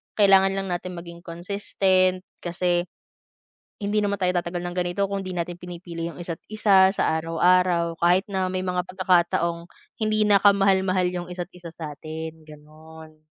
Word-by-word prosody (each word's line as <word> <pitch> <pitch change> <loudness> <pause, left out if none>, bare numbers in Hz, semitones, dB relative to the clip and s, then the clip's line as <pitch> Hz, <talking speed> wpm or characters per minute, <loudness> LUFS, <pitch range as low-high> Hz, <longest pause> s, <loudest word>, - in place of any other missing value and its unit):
kailangan 195 -2 +5
lang 195 0 -3
natin 180 +1 -4
maging 170 0 -9
consistent 185 +1 0 0.2
kasi 175 0 -1 0.9
hindi 205 +1 -1
naman 205 -1 0
tayo 180 -1 +3
tatagal 175 0 -4
ng 175 0 -5
ganito 180 +2 0
kung 195 -1 -3
'di 185 - -5
natin 175 0 -3
pinipili 175 -1 -7
yung 175 - -10
isa't 170 -2 -5
isa 195 -3 +5
sa 160 -5 +1
araw-araw 170 +1 +2
kahit 180 +3 +4
na 190 -1 -1
may 185 0 -2
mga 180 -1 -1
pagkakataong 170 -2 +1 0.3
hindi 215 -1 +1
na 205 -1 +6
ka-mahal-mahal 195 -2 +3
yung 175 -1 -5
isa't 175 0 -5
isa 170 -2 -10
sa 150 -3 -7
'tin, 160 0 -7
ganon. 155 +1 -15
180 Hz, 155 wpm, -24 LUFS, 170-190 Hz, 0.9 s, na